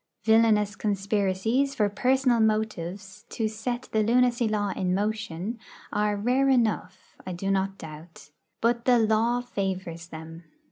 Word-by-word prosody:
Villainous 220 -2 +4
conspiracies, 205 +6 0
for 210 -4 +2
personal 250 +4 +2
motives, 210 -2 -1
to 225 - -1
set 240 +3 -4
the 220 - +2
lunacy 240 +1 +3
law 210 -1 0
in 185 -1 -1
motion, 210 0 -3 0.3
are 210 0 +1
rare 250 +6 +2
enough, 215 -7 0
I 185 - -5
do 195 +3 -2
not 195 0 0
doubt. 155 -2 -11 0.3
But 235 0 +1
the 250 -1 +5
law 225 +2 +2
favours 190 -7 -4
them. 165 +1 -10
210 Hz, 135 wpm, -26 LUFS, 190-230 Hz, 0.3 s, the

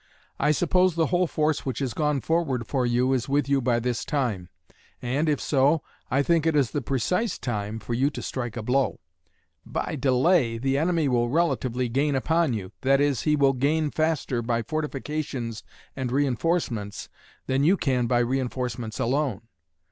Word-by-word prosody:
I 150 - +2
suppose 180 +3 +2
the 165 -1 +2
whole 180 0 +3
force 155 -1 0
which 130 -4 -3
has 130 -5 -2
gone 150 +1 0
forward 155 -8 0
for 130 -1 0
you 125 +2 +2
is 130 0 -1
with 140 0 +1
you 140 -1 +2
by 120 -1 +1
this 120 0 -2
time. 115 - -2 0.5
And, 140 +6 0
if 145 - +1
so, 145 +2 +2 0.3
I 140 +2 +2
think 165 0 +2
it 160 - +2
is 135 -7 +2
the 145 - -1
precise 175 - -1
time 105 -3 -3
for 115 +2 -5
you 130 +4 +2
to - - -7
strike 120 -3 -4
a 115 - -4
blow. 130 +4 +1 0.6
By - - -3
delay, 130 -1 +3
the 135 +3 0
enemy 165 +1 +1
will 120 -2 +1
relatively 130 -5 0
gain 140 +4 +1
upon 160 +1 +1
you 95 -4 -5
that 135 +1 +3
is, 145 -3 +1
he 150 - +4
will 140 -2 +3
gain 145 +3 +1
faster 155 -6 0
by 115 0 -1
fortifications 140 -4 -4 0.3
and 130 -2 -3
reinforcements 130 - -1 0.4
than 135 +1 +1
you 180 +6 +4
can 125 -6 0
by 120 0 +2
reinforcements 125 -2 -2
alone. 130 -4 0
135 Hz, 175 wpm, -25 LUFS, 120-150 Hz, 0.6 s, he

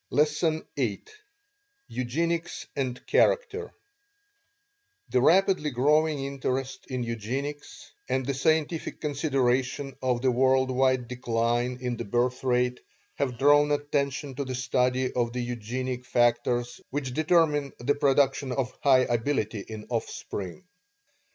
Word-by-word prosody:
LESSON 155 +2 +1
VIII 115 -8 -1 0.8
EUGENICS 165 +7 -2
AND 130 -3 -3
CHARACTER 450 -2 +2 1.4
The 125 - +2
rapidly 185 +1 +4
growing 150 +2 +2
interest 135 -1 -3
in 130 -2 -3
Eugenics, 140 - -5 0.2
and 130 -1 0
the 140 - -1
scientific 155 +4 0
consideration 135 -2 0
of 125 -1 0
the 130 - +4
world 130 +1 +3
wide 130 -1 +2
decline 120 0 0
in 125 -2 -2
the - - -4
birth 120 +5 0
rate 125 -1 +1 0.4
have 130 -4 -1
drawn 145 +2 +5
attention 145 -1 -1
to 140 - -1
the 130 -1 -4
study 125 0 0
of 120 -1 0
the 125 - -2
eugenic 125 +2 -4
factors 120 0 +1
which 135 -2 -3
determine 155 -2 +2
the 130 +4 +1
production 140 -1 +2
of 125 -1 -2
high 130 -2 +5
ability 120 -3 0
in 105 +1 -8
offspring. 100 - -4
130 Hz, 120 wpm, -27 LUFS, 125-145 Hz, 1.4 s, drawn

